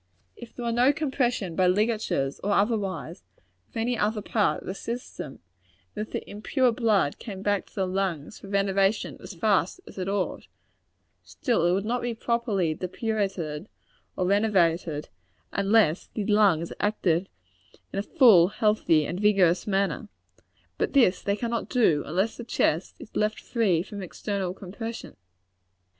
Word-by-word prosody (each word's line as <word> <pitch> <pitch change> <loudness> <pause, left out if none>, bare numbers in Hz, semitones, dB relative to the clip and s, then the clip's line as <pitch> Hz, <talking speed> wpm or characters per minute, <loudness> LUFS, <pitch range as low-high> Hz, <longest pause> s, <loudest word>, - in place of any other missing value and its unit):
If 240 -1 -12
there 240 - -5
were 235 - 0
no 245 +4 +4
compression 255 - -1
by 185 +1 +3
ligatures 205 -8 0
or 205 +1 +1
otherwise, 200 - -1 0.5
of - - -9
any 235 +2 0
other 210 -1 0
part 210 -1 +1
of - - -13
the 185 - -3
system, 230 - -6 0.6
and 215 - -3
if - - -23
the - - -4
impure 245 +5 +1
blood 215 - +1
came 195 -3 -7
back 205 -2 0
to - - -23
the 195 - 0
lungs 185 -2 -2
for - - -11
renovation 195 +1 +1
as 200 - -10
fast 200 - +1
as - - -10
it 185 +1 -2
ought, 200 -2 -2 0.8
still 230 - 0
it 175 - +3
would 195 +2 0
not 240 +2 -1
be 240 -1 -2
properly 220 -8 0
depurated 185 -4 -3 0.5
or 185 - 0
renovated, 175 -6 +1 0.4
unless 200 -4 +3
the 210 - -2
lungs 195 -6 +3
acted 190 -4 +1 0.6
in 195 - -1
a - - +1
full, 210 - +6
healthy 205 -7 +2
and 180 +6 -4
rigorous 190 -4 +3
manner. 200 +2 0 0.7
But - - 0
this 235 -10 +4
they 200 - 0
cannot 235 +1 -3
do, 195 - +3
unless 190 +7 0
the 240 - -6
chest 175 -7 0
is - - -13
left 210 0 0
free 195 -9 +1
from 200 +1 -8
external 190 0 -3
compression. 225 +5 -7
200 Hz, 155 wpm, -26 LUFS, 180-225 Hz, 0.8 s, full